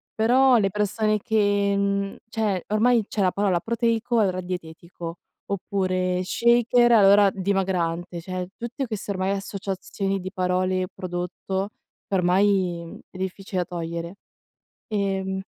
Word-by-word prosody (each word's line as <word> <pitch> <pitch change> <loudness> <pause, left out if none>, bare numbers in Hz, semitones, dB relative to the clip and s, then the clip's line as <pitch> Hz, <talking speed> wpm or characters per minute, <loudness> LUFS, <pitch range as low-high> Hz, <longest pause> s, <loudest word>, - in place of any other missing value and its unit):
Però 250 +3 +5
le 195 -3 +2
persone 210 +2 0
che, 205 -1 +2
mhmm 200 0 0
cioè 210 -5 -1
ormai 225 +2 +3
cioè 205 - -2
la 185 -1 +3
parola 195 -4 +1
proteico 235 +1 +1
è 200 - +4
ora 185 0 -2
dietetico 170 -1 -7 0.3
oppure 185 -2 -1
shaker, 240 +3 +3
allora 200 -1 +7
dimagrante, 180 -3 -1
cioè 185 0 -4
tutte 240 +3 -4
queste 210 -2 -4
ormai 190 0 -1
associazioni 195 0 -3
di 185 0 -6
parole 185 -1 0
prodotto 185 +2 -4 0.4
ormai 180 -2 +1
è 185 - -12
difficile 190 +1 -4
da - - -15
togliere. 170 +2 -4 0.7
Ehm 190 -2 -1
195 Hz, 125 wpm, -24 LUFS, 185-210 Hz, 0.7 s, allora